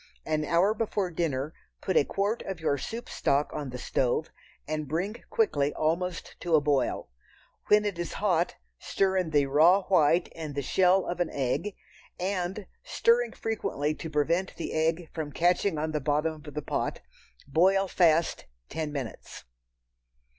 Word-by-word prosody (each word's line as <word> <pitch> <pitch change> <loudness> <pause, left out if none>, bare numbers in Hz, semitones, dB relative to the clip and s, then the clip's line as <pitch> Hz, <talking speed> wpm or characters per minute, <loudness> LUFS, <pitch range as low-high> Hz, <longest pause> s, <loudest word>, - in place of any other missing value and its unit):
An 155 -1 0
hour 175 +7 +3
before 205 -4 -1
dinner 155 -3 -2 0.3
put - - -2
a - - +6
quart 200 +8 -1
of 190 -3 -5
your 155 -3 +1
soup 225 - -6
stock 140 +2 0
on 145 -3 -4
the 125 - -6
stove 125 +4 0 0.4
and 155 -1 -3
bring 180 - -3
quickly 150 - +1
almost 170 +1 -1
to 170 -2 +1
a - - +6
boil. 145 - 0 0.6
When 210 0 +5
it 200 -4 -2
is 175 - -3
hot, 180 -4 +1 0.2
stir 190 -1 0
in 180 -3 0
the 145 -2 +3
raw 165 +8 +5
white 170 -2 +3
and 155 -3 -6
the 140 - -2
shell 185 +5 +3
of 175 0 -4
an 175 - +1
egg, 145 +9 -2 0.4
and, 190 +1 -2 0.2
stirring 235 0 +2
frequently 155 -9 -2
to 160 - -7
prevent 165 +5 0
the 165 - -5
egg 160 +2 0
from 155 -3 -4
catching 175 +2 +2
on 155 +1 -1
the 150 -1 -1
bottom 150 +2 0
of 150 - -8
the 150 - -3
pot, - - -2 0.5
boil 190 +6 +3
fast 170 -3 +2 0.2
ten 155 -2 -3
minutes. 135 -7 -6
165 Hz, 160 wpm, -28 LUFS, 150-190 Hz, 0.6 s, a